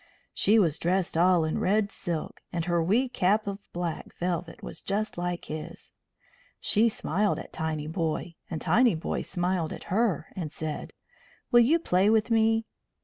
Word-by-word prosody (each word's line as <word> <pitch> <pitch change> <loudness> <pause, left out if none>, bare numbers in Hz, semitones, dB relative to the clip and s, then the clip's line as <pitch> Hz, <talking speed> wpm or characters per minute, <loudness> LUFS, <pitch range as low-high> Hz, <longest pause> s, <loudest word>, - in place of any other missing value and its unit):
She 215 +3 +4
was 165 -8 +3
dressed 180 0 0
all 175 0 +4
in 155 - -1
red 205 +2 +2
silk, 170 -3 -4
and 170 -1 -2
her 170 -1 +1
wee 225 +10 +2
cap 215 -3 +1
of 200 0 -4
black 175 -2 -4
velvet 175 -1 -3
was - - -6
just 210 +2 -2
like 175 0 -3
his. 155 0 -7 0.7
She 225 +3 +3
smiled 205 0 0
at - - -9
Tinyboy 160 +1 -2 0.2
and 160 - -3
Tinyboy 220 -7 +2
smiled 180 -3 -1
at - - -6
her, 215 -5 +1
and 165 -5 -4
said: 155 -1 -5 0.6
"Will 240 - +7
you 260 +8 +5
play 195 - +2
with 220 +1 +2
me?" 225 0 +3
180 Hz, 155 wpm, -28 LUFS, 165-215 Hz, 0.7 s, Will